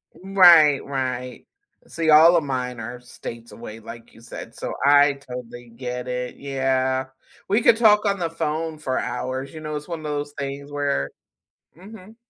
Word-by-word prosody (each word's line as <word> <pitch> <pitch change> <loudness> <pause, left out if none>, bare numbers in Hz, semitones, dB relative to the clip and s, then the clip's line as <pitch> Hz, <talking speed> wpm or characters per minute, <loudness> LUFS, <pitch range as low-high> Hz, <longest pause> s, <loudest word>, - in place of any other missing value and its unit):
Right, 175 -7 +6
right. 125 -2 -4 0.4
See, 165 -1 -2
all 160 +3 +8
of 165 - +2
mine 125 -3 -3
are 120 +2 -7
states 120 -1 -10
away 115 -1 -10
like 115 +1 -12
you 115 - -17
said, 115 0 -10
so - - -5
I 145 0 +6
totally 125 -3 -10
get 125 +1 -6
it 125 0 -4
Yeah, 130 -1 -1 0.4
we 210 +4 +2
could 225 - +5
talk 210 -2 +5
on 200 -1 0
the 170 -2 -1
phone 160 0 -3
for 130 -4 -2
hours, 130 +3 -4
you 155 - -8
know, 155 -1 -5
it's 150 0 -6
one 170 -2 -5
of - - -12
those 145 -1 -4
things 140 +1 -6
where 140 - -1 0.7
Mhm. 210 +2 -13
140 Hz, 170 wpm, -23 LUFS, 125-160 Hz, 0.7 s, all